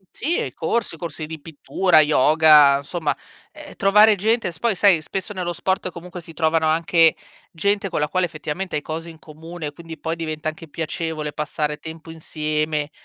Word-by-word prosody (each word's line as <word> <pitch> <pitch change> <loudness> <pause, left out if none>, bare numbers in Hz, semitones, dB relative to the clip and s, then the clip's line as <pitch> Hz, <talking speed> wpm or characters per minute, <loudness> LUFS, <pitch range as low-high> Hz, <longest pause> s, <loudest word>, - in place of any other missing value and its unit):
Sì, 330 +6 -1
ehm, - - -2
corsi, 210 -8 -2
corsi 160 -2 -6
di 160 0 -7
pittura, 165 +3 +2
yoga, 150 -1 +6
insomma, 145 0 -3 0.4
ehm, - - -12
trovare 210 +2 +5
gente 220 +1 0
s 160 - -13
poi 235 -3 +1
sai, 185 -3 +4
spesso 195 +6 -5
nello 180 -2 -3
sport 190 +2 -2
comunque 175 +1 -9
si 165 -1 -12
trovano 160 0 +1
anche 165 +1 +3 0.4
gente 200 +4 0
con - - -2
la 150 0 0
quale 185 +1 +1
effettivamente 165 +2 -5
hai 150 - -1
cose 165 +2 -6
in 160 - -13
comune, 160 +1 -8
quindi 165 +1 -11
poi 160 0 -3
diventa 155 -2 -5
anche 160 +1 -5
piacevole 160 0 -4
passare 150 0 -3
tempo 160 +1 -10
insieme, 155 -1 -2
160 Hz, 175 wpm, -21 LUFS, 155-180 Hz, 0.4 s, yoga